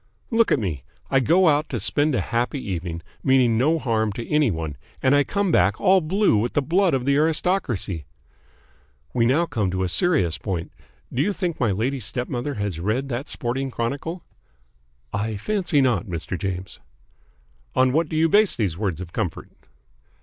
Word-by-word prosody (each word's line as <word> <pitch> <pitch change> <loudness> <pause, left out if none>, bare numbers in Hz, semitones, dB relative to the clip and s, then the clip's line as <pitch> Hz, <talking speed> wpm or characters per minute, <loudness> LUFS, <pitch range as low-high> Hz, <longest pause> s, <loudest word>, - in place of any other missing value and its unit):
"Look 230 -1 +3
at - - +5
me. 85 - -3 0.3
I 135 - +5
go 170 +7 +4
out 150 0 +2
to 120 - -2
spend 145 +8 +1
a - - +1
happy 120 +4 -1
evening, 85 -2 -4 0.2
meaning 130 -4 +4
no 150 +8 +3
harm 110 -7 0
to 115 +3 -6
any 150 -3 +3
one, 80 -5 -3 0.2
and 130 - +3
I 145 0 +5
come 200 +3 -1
back - - +3
all 190 -1 +4
blue 185 - +2
with 115 +4 -1
the 145 - +2
blood 175 +1 +2
of 125 -2 -2
the 140 0 +3
aristocracy. 150 - 0 1.1
We 115 - +2
now 150 +7 +3
come 110 - -1
to 95 +1 -1
a 90 - -1
serious 90 - +1
point. 90 -5 -4 0.4
Do 125 - +1
you 205 - +1
think 180 -4 -3
my 120 -4 +2
lady 120 +8 -1
stepmother 125 +4 -3
has 100 -6 -3
read 115 +10 -1
that 125 +2 -4
sporting 130 +3 -2
chronicle?" 140 +9 -4 0.9
"I 105 +1 -2
fancy 175 - +1
not, 120 -9 +1
Mr. 85 0 -4
James." 95 0 -5 1.0
"On 130 0 +3
what 160 +1 +1
do - - -4
you 160 +1 +4
base 205 +4 +4
these 95 -6 -1
words 95 -6 -2
of 85 -2 -9
comfort?" 100 -7 -3
125 Hz, 180 wpm, -23 LUFS, 100-155 Hz, 1.1 s, at